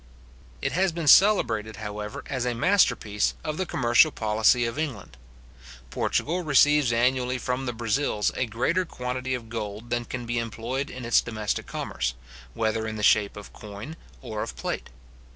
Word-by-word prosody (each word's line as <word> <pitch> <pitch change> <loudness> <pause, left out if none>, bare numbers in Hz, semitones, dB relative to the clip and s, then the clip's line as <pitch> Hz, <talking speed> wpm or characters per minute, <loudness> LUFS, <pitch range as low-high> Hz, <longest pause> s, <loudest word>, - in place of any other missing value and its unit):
It - - 0
has 190 +2 +2
been 165 -1 -4
celebrated, 115 - +5
however, 105 0 -6
as 130 -3 -3
a 125 -1 -1
masterpiece 115 - +2
of 155 -1 -3
the 185 - -2
commercial 120 +4 +4
policy 110 0 +2
of 115 +5 -3
England. 115 - -4 0.8
Portugal 175 +4 0
receives 145 -3 +4
annually 125 +2 +1
from 125 +2 -3
the - - 0
Brazils 115 -1 0
a 130 - -1
greater 130 +12 0
quantity 130 -4 -3
of 120 -2 -7
gold 110 0 -6
than 120 0 0
can 120 0 -5
be 120 0 -1
employed 115 +4 -3
in 125 -1 -7
its 120 - +4
domestic 110 -3 -3
commerce, 65 - -3 0.4
whether 110 0 0
in 110 - -4
the 105 - -5
shape 105 -1 +3
of 105 - -10
coin 105 +9 -9 0.3
or 110 -4 -4
of - - -5
plate. 60 - -4
120 Hz, 165 wpm, -26 LUFS, 110-135 Hz, 0.8 s, celebrated